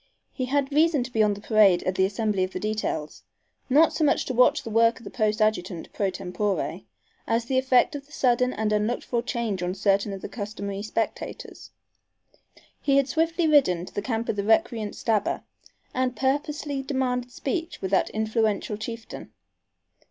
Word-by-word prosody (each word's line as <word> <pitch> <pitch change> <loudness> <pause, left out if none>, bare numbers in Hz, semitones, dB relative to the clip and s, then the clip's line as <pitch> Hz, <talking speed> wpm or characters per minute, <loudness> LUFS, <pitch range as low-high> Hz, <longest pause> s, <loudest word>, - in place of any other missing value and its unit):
He 255 - -2
had 275 +2 0
reason 305 -3 +3
to 255 - -8
be 225 - +1
on 210 -1 +3
the 205 - -11
parade 205 -5 +4
at 185 - 0
the 190 +1 +2
"assembly 205 -1 0
of 185 - -3
the - - -3
details," 210 -8 -3 0.5
not 300 +5 +5
so 315 - 0
much 295 - +2
to 260 - -3
watch 250 +1 +4
the 225 - -6
work 230 +1 +4
of - - -14
the - - -8
post 215 -1 0
adjutant 185 -5 -2
pro 200 -2 0
tempore, 195 +2 -2 0.5
as 230 +1 +1
the 260 +1 +1
effect 260 +2 +3
of 280 -1 -7
the - - -23
sudden 250 -2 +2
and 215 -2 -1
unlooked 210 +3 0
for 240 -1 -1
change 230 -6 -2
on 180 +1 -2
certain 200 +1 +1
of 195 -1 -7
the - - -3
customary 200 -2 -5
spectators. 220 +1 -4 1.1
He 275 -1 +3
had 275 -1 +3
swiftly 330 +2 +1
ridden 185 - +4
to - - -13
the 205 - -2
camp 230 -1 -2
of 210 - -2
the 200 - 0
recreant 220 0 +1
Stabber 215 -3 0 0.5
and 255 -1 0
purposely 285 +1 -1
demanded 255 -2 -2
speech 330 +7 -3
with 190 - -4
that 195 - +2
influential 220 -1 -1
chieftain. 225 +1 -7
225 Hz, 185 wpm, -25 LUFS, 205-260 Hz, 1.1 s, not